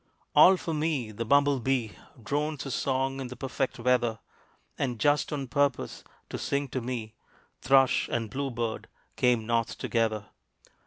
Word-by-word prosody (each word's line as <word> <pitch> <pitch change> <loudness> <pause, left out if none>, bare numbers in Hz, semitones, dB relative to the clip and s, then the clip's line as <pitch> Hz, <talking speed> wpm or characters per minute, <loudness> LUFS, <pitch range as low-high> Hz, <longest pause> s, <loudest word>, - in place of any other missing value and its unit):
All 190 0 +8
for 165 - -4
me 150 -7 -1
the 115 +2 -4
bumble 140 +2 +4
bee 125 -3 0 0.3
Drones 150 +3 -2
his 135 - -4
song 135 0 0
in 130 - -4
the 125 - -8
perfect 135 +1 -3
weather; 120 -2 +1 0.6
And, 125 -3 -2
just 145 +7 +2
on 140 -3 -3
purpose 140 0 0 0.3
to - - -4
sing 140 0 -1
to 130 - -3
me, 115 -3 -4 0.5
Thrush 135 -1 +4
and 115 -1 -1
blue 140 +2 -2
bird 115 -2 -3 0.3
came 120 -3 +2
North 115 0 0
together. 110 -3 0
130 Hz, 155 wpm, -28 LUFS, 115-140 Hz, 0.6 s, All